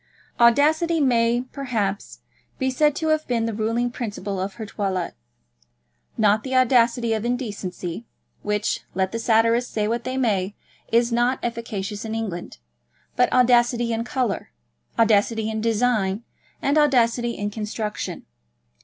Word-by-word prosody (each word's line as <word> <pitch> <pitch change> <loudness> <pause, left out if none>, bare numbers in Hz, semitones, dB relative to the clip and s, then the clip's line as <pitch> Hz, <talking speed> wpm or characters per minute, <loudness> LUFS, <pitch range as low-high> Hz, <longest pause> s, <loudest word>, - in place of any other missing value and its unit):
Audacity 310 +8 +4
may, 240 -3 +3
perhaps, 220 -8 -3 0.4
be 260 -1 0
said 295 +2 +2
to 320 +1 -1
have 310 0 +1
been 230 -2 0
the 230 - -2
ruling 230 +3 0
principle 205 -5 -4
of 190 +1 -3
her 220 - -6
toilet; 190 -4 -2 1.0
not 215 0 +3
the 260 0 -3
audacity 240 -2 +3
of 220 -1 -2
indecency, 210 -5 -4 0.3
which, 210 +1 -1 0.2
let 190 0 0
the 230 - -3
satirists 230 +1 +3
say 210 -1 0
what 235 +1 -1
they 255 +1 -3
may, 205 -6 0 0.4
is 235 +1 +3
not 240 +2 +2
efficacious 215 -3 -4
in 220 0 -4
England, 195 - -5 0.6
but 250 - +3
audacity 240 -1 +3
in 225 0 -1
colour, 245 - -2 0.5
audacity 220 0 +2
in 220 0 -3
design, 220 -2 +1 0.4
and 285 +2 +3
audacity 240 -4 +2
in 205 0 -3
construction. 210 0 -4
230 Hz, 135 wpm, -23 LUFS, 210-245 Hz, 1.0 s, Audacity